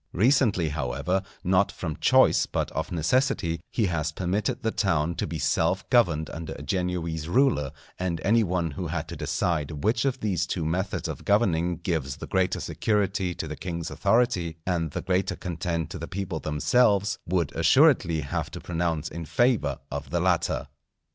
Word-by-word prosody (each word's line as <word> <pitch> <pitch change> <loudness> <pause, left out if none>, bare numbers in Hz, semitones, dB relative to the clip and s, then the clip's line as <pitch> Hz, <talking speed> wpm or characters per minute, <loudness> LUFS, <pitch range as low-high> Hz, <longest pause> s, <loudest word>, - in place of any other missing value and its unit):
Recently, 105 - +3
however, 70 +6 -1 0.2
not 95 +2 +3
from 80 -4 -4
choice - - +4
but - - -2
of 80 - -3
necessity, 85 - +1
he 110 - +1
has 80 -3 -1
permitted 95 +6 -2
the 110 - +1
town 85 -6 +1
to - - -3
be 80 - -4
self 80 +4 +1
governed 85 - +3
under 80 -1 -6
a - - -9
Genoese 85 -1 -2
ruler; 100 - +2 0.3
and 90 -3 -1
any 115 +3 +4
one 85 -4 -1
who 90 +5 -4
had 80 -1 -3
to - - -6
decide 75 -3 -2
which 115 +3 +2
of 135 -1 0
these 100 -7 0
two 85 -4 -2
methods 95 +5 -1
of - - -6
governing 90 -5 +2
gives 80 -6 -2
the - - -7
greater 95 -1 0
security 100 -4 0
to - - -4
the 75 - -5
king's 85 -2 -5
authority 100 -6 +1
and 85 -3 0
the - - -5
greater 95 +1 0
content 85 -2 -3
to 90 - -6
the 85 - -5
people 95 -3 -4
themselves, 100 +6 +2
would 85 -3 0
assuredly 80 -2 +4
have 70 - -3
to - - -8
pronounce 85 -2 -2
in 85 - -6
favour 105 - +1
of 70 0 -5
the 85 - 0
latter. 90 -1 +1
85 Hz, 175 wpm, -26 LUFS, 80-95 Hz, 0.3 s, choice